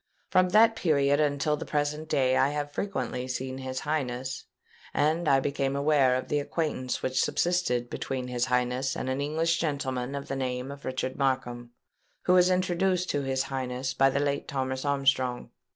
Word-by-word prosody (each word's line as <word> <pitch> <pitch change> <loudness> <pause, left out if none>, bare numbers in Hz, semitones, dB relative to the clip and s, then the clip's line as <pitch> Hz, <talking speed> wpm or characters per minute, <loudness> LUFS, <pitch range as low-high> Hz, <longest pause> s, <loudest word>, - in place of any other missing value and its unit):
From 185 0 +4
that 225 +4 +5
period 145 -7 +2
until 150 0 +1
the - - -6
present 150 +1 -2
day 130 -3 +2
I 135 - +4
have 145 0 -3
frequently 130 - -3
seen 130 +1 -4
his 130 0 -4
Highness; 130 -4 -3 0.5
and 155 +3 +1
I 135 -2 +5
became 135 0 -1
aware 140 -3 +3
of 130 - -3
the 150 - +1
acquaintance 145 -4 -2
which 130 0 +1
subsisted 170 -9 0
between 130 +1 -4
his 125 -1 0
Highness 125 +1 0
and 130 - -3
an 135 +2 -1
English 160 +3 0
gentleman 135 -4 -2
of 140 - -5
the 135 - -3
name 130 0 -3
of 140 0 -10
Richard 130 0 -3
Markham, 125 -3 -1 0.5
who 180 - +3
was 180 0 +6
introduced 185 0 +1
to 145 - 0
his 135 -1 0
Highness 130 -1 -3
by 135 0 +4
the 135 - 0
late 140 0 -1
Thomas 130 0 -2
Armstrong. 135 -3 +1
135 Hz, 175 wpm, -28 LUFS, 130-150 Hz, 0.5 s, was